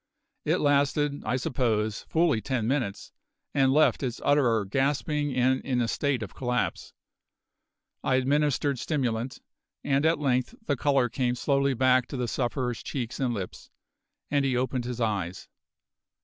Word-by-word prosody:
It - - +2
lasted, 145 0 +1
I - - 0
suppose, 110 -5 -1
fully 160 -8 +2
ten 125 -4 -1
minutes, 120 -7 -2 0.4
and 135 -2 +3
left 155 +3 +4
its 125 -4 -3
utterer 120 -7 +3
gasping 145 +5 0
and 130 +1 +2
in 125 -2 -1
a 120 - +1
state 135 -2 0
of 100 - -8
collapse. 125 -1 -2 1.1
I 130 - +2
administered 140 0 +1
stimulant, 125 -4 -2 0.4
and 140 +1 +1
at 160 +1 +3
length 130 - 0
the 145 - +1
colour 135 -1 +2
came 125 0 -1
slowly 140 +1 +1
back 130 0 +3
to 135 - -6
the 125 -1 -1
sufferer's 125 0 -2
cheeks 120 -4 -4
and 130 -3 +1
lips, 100 -5 -6 0.6
and 145 -1 +2
he 130 -2 +1
opened 130 -1 -1
his 125 -1 -4
eyes. 100 -6 -2
130 Hz, 150 wpm, -27 LUFS, 120-140 Hz, 1.1 s, left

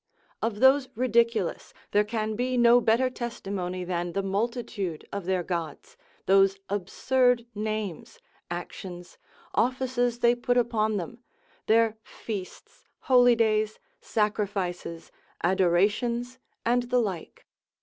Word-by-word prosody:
Of 220 -2 -2
those 265 0 +5
ridiculous, 230 -5 +1 0.2
there 210 - +4
can 215 0 -2
be 250 +2 -1
no 240 0 +6
better 230 +3 +3
testimony 195 -7 -4
than 175 -1 -3
the 195 - -1
multitude 200 -4 -3
of 200 -3 -4
their 185 -1 0
gods, 170 -4 -5 0.3
those 195 0 +4
absurd 245 +5 +1
names, 215 -4 -4 0.3
actions, 175 +1 -7 0.3
offices 245 -1 +1
they 240 0 +4
put 245 0 0
upon 220 -3 +1
them, 195 +6 -6 0.5
their 225 0 +3
feasts, 205 -4 -8 0.2
holy 245 -2 +5
days, 215 -1 +1 0.2
sacrifices, 200 -6 -2 0.3
adorations, 205 +8 +1 0.3
and 240 +1 +1
the 250 - +2
like. 195 -8 -4
215 Hz, 110 wpm, -27 LUFS, 190-240 Hz, 0.5 s, no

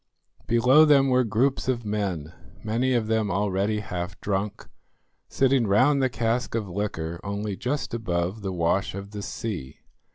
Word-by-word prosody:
Below 125 +6 +6
them 140 -3 +5
were 130 0 +4
groups 125 +6 0
of 120 -3 -1
men, 95 -7 -2 0.3
many 120 +4 0
of 120 -3 +1
them 110 -1 0
already 100 +2 0
half 90 -2 -5
drunk, 100 0 -3 0.6
sitting 135 -3 +2
round 130 +8 +4
the 130 - +2
cask 120 0 -1
of 110 -3 -2
liquor 85 -4 -3
only 100 0 -3
just 135 +6 -3
above 95 -2 -2
the 95 -1 -3
wash 90 +2 0
of 100 +1 -7
the 105 -1 -6
sea. 100 - -5
105 Hz, 155 wpm, -25 LUFS, 95-125 Hz, 0.6 s, Below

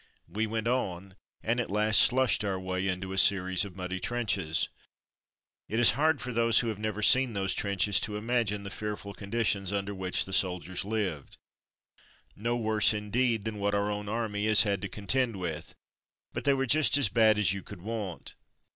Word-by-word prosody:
We 105 +6 -2
went 110 +1 -3
on, 95 -6 -3 0.3
and 120 +2 0
at 120 - -3
last 105 +1 +4
slushed 130 -3 +3
our 95 -2 -2
way 95 0 -3
into 95 0 -4
a 95 - +2
series 95 -2 +4
of 100 -3 -8
muddy 95 0 -5
trenches. 95 -9 -1 1.0
It 110 - -2
is 120 - +6
hard 155 0 +1
for 125 - -5
those 115 0 +2
who 115 - -2
have 105 -2 -5
never 110 0 -3
seen 130 +1 +5
those 95 -2 -1
trenches 100 0 +1
to 105 -1 -3
imagine 110 -2 -1
the 100 - -7
fearful 105 -1 -6
conditions 100 -2 -1
under 100 0 -3
which 95 -2 -1
the 95 - -8
soldiers 90 -1 0
lived; 100 -8 -4 1.0
no 115 +3 -2
worse, 110 -2 +2
indeed, 110 +1 -1
than 110 -2 -5
what 100 0 0
our 100 +1 0
own 105 0 -5
army 105 -2 -2
has 110 -1 +6
had 100 -3 -1
to 100 - -5
con 100 +1 -10
tend 125 -1 +1
with, 85 -4 -6 0.6
but - - -5
they 140 - +4
were 135 0 -1
just 145 +2 +4
as 140 - +4
bad 110 +1 +4
as 105 -2 +2
you 100 - -5
could 95 -3 -12
want. 105 -6 -6
105 Hz, 190 wpm, -28 LUFS, 95-115 Hz, 1.0 s, is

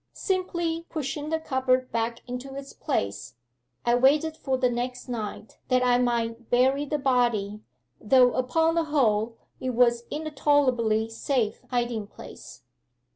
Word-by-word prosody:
Simply 345 -3 -2
pushing 295 -1 -4
the 320 0 0
cupboard 260 -3 0
back 230 +1 -2
into 250 +2 -6
its 275 0 -8
place, 100 +4 -3 0.5
I 240 - +3
waited 290 +6 +3
for 265 -4 -1
the 255 -1 +2
next 245 +1 -3
night 220 -3 -6
that 255 -1 +2
I 245 0 +4
might 235 -1 -1
bury 265 +4 +3
the 300 +1 -1
body, 240 -6 +1 0.4
though 250 +2 +5
upon 320 +6 +1
the 335 -1 +1
whole 230 -7 +1 0.2
it 255 -2 -3
was 235 -1 +3
in 310 +2 -4
a 310 - -4
tolerably 250 -7 +2
safe 225 -1 -1
hiding 240 -4 -1
place. - - -12
250 Hz, 145 wpm, -26 LUFS, 235-285 Hz, 0.5 s, though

